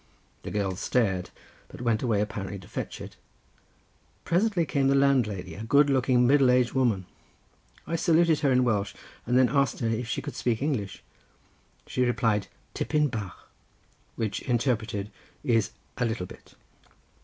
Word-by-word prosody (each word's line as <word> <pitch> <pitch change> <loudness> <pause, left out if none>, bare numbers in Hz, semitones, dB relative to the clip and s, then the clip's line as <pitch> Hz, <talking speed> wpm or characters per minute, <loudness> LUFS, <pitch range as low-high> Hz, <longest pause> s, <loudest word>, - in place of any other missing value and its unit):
The - - -6
girl 100 -3 -1
stared, 95 -8 0 0.4
but - - -12
went 115 -3 +1
away 110 -5 +1
apparently 100 -2 -4
to 95 - -13
fetch - - -5
it. - - -10 1.1
Presently 180 -1 +2
came 135 -1 +1
the 135 - +3
landlady, 115 -11 +2
a 100 - -7
good 140 +5 +4
looking 130 -2 +3
middle 135 0 +5
aged 125 -1 +3
woman. 115 -8 +1 0.8
I 165 - -2
saluted 165 -1 +3
her 140 - +2
in 125 0 +4
Welsh 105 -5 0 0.3
and 125 +1 +3
then 130 -1 +6
asked 140 +3 +1
her 115 - -1
if 115 +1 -2
she - - -3
could - - -6
speak 115 -3 0
English. 125 -9 -2 0.8
She 125 - -2
replied 115 -4 +1 0.3
"Tipyn 150 -3 0
bach," 100 -7 -6 0.7
which 110 -3 -2
interpreted, 115 -4 -1 0.3
is, 115 -4 +2 0.3
a 125 - +2
little 110 -5 -2
bit. - - -15
120 Hz, 155 wpm, -27 LUFS, 105-135 Hz, 1.1 s, then